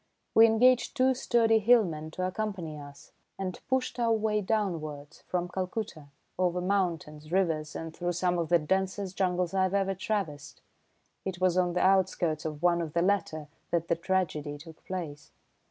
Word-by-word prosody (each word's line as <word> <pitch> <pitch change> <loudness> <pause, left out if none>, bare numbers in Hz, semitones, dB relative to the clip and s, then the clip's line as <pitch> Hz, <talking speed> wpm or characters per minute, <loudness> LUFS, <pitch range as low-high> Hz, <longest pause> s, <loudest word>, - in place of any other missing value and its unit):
We 225 +1 +8
engaged 245 +3 +3
two 260 +1 +4
sturdy 230 -3 +3
hillmen 200 -9 +3
to 185 - -2
accompany 185 -5 -3
us 145 -1 -13 0.3
and 185 -2 -4
pushed 255 -1 -1
our 230 -1 +2
way 215 -1 +1
downwards 165 -9 -3
from 180 -1 -1
Calcutta 185 -3 -4 0.3
over 180 -1 +1
mountains, 170 -5 -2
rivers 165 -5 0
and 165 0 -6
through 175 0 -2
some 175 0 0
of 165 - -2
the 175 - +6
densest 190 +3 -1
jungles 180 -2 0
I've 190 0 +1
ever 195 -1 +1
traversed. 190 -7 -4 0.6
It 190 -2 -4
was 185 -1 +2
on 180 -1 +2
the 180 - 0
outskirts 180 -5 +2
of 155 0 -5
one 175 -1 +3
of 160 -3 -5
the 170 - +2
latter 165 -6 0 0.2
that 170 -1 -1
the 170 - +3
tragedy 165 -4 -1
took 160 +1 -14
place. 165 -6 -6
180 Hz, 165 wpm, -29 LUFS, 160-200 Hz, 0.6 s, We